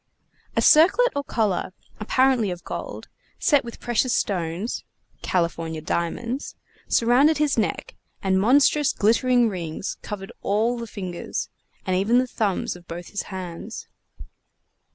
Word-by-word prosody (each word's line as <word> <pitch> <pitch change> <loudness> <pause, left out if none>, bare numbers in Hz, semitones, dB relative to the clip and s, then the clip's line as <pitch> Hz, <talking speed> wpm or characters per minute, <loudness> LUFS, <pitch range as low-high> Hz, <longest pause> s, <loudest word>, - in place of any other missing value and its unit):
A - - +2
circlet 385 +11 +6
or 285 - -1
collar, 205 -8 -1 0.3
apparently 250 0 +2
of 175 -1 -6
gold, - - -6 0.3
set 290 -5 +3
with 235 -1 -9
precious 240 +1 +1
stones 180 +3 -2 0.4
(California 165 -2 -1
diamonds!) 230 - -3 0.3
surrounded 260 +7 +4
his 295 -2 +2
neck, 220 -3 -2 0.2
and 190 -1 +1
monstrous 280 +5 +4
glittering 240 +3 +3
rings 175 -3 -4
covered 195 -2 -7
all 220 +4 +1
the 230 - -5
fingers, 185 -5 -5 0.4
and 185 - 0
even 205 +6 +3
the 255 - +3
thumbs 215 -8 -1
of 175 -1 -15
both 170 +1 -7
his 205 - -3
hands. 185 +3 -7
215 Hz, 130 wpm, -24 LUFS, 185-250 Hz, 0.4 s, circlet